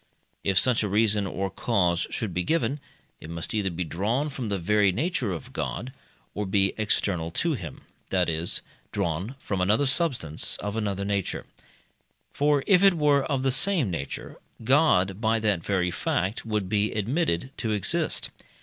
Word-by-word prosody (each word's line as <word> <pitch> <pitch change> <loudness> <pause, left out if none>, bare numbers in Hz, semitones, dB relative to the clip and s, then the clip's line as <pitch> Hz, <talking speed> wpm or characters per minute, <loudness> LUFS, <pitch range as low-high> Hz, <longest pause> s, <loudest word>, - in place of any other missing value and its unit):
If 95 -2 +1
such 125 +5 +4
a 105 - -1
reason 105 0 +2
or 95 0 -3
cause 90 -6 +1
should 105 -6 -3
be 90 +1 -1
given, 150 - 0 0.4
it 80 - -10
must 85 -1 -3
either 105 -3 0
be 90 0 -3
drawn 110 - -1
from 130 -5 -5
the 100 - 0
very 100 +2 +3
nature 135 - -1
of 85 - -7
God, 125 +7 -4 0.4
or 105 -1 -3
be 95 0 +2
external 95 -5 0
to 165 - 0
him 85 - -7 0.3
that 90 -2 +2
is, 80 +1 0 0.3
drawn 100 - -2
from 100 -8 -3
another 105 +9 +3
substance 130 - +1
of 105 +2 -4
another 100 -3 -2
nature. 100 -2 -2 0.9
For 145 -1 +2
if 185 -3 +5
it 195 -2 +6
were 145 -3 +3
of 135 -3 -1
the 135 - +2
same 145 - +3
nature, 70 -5 -5 0.3
God, 110 - +3
by 110 0 +2
that 105 -6 0
very 90 -3 0
fact, 95 +5 -2
would 105 -3 -1
be 105 +2 +1
admitted 120 - 0
to 110 - -1
exist. 105 -3 0
105 Hz, 165 wpm, -26 LUFS, 90-130 Hz, 0.9 s, it